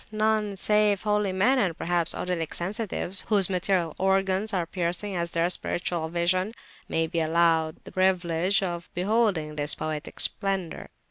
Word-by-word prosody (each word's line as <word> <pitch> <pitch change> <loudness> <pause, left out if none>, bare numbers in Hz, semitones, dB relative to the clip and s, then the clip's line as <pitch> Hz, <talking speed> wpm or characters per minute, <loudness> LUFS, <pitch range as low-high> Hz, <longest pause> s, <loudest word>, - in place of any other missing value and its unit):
none 215 -1 +1
save 210 0 +2
holy 210 -2 +1
men 245 +9 +3
(and 180 -8 0
perhaps, 170 -1 0
odylic 175 -3 -3
sensitives), 195 0 -2
whose 200 -3 +3
material 180 -3 0
organs 195 +2 +1
are 180 -3 0
piercing 175 +3 -3
as 170 -1 -1
their 170 0 +1
spiritual 175 -2 -2
vision, 185 +5 0 0.4
may 165 0 +1
be 165 +1 -2
allowed 160 0 +2
the - - -11
privilege 185 0 +1
of 175 -2 -4
beholding 185 -6 0
this 145 0 0
poetic 155 -1 -5
splendour. 195 -4 -1
185 Hz, 145 wpm, -26 LUFS, 170-200 Hz, 0.4 s, men